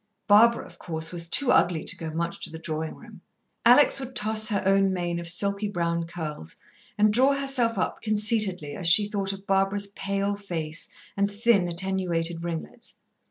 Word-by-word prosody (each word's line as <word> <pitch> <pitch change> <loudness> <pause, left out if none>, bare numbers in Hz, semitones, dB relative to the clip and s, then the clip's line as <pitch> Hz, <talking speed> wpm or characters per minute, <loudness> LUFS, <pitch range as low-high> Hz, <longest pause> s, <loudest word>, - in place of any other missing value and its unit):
Barbara, 230 +3 +5
of - - -16
course, 160 -1 -4
was 170 -1 -5
too 280 +5 +4
ugly 170 -3 +2
to - - -2
go 165 -3 -6
much 170 +2 -4
to - - -3
the 160 - -8
drawing 160 -1 -4
room. - - -15 0.4
Alex 250 +4 +6
would 260 -1 -7
toss 215 0 +1
her 200 -3 -1
own 195 0 +3
mane 175 -2 -2
of 170 0 0
silky 200 +4 0
brown 170 -3 -2
curls, 155 - -7 0.4
and 210 0 +3
draw 260 +5 +4
herself 270 -5 0
up 185 - -2
conceitedly, 210 -7 +1
as 180 - -2
she 205 +5 +5
thought 200 -2 -2
of 195 0 -9
Barbara's 195 +1 +1
pale 200 +1 -2
face, 165 -5 -5 0.3
and 200 0 +1
thin, 205 -3 +2
attenuated 170 -2 -2
ringlets. 170 -2 -6
195 Hz, 175 wpm, -25 LUFS, 170-210 Hz, 0.4 s, Alex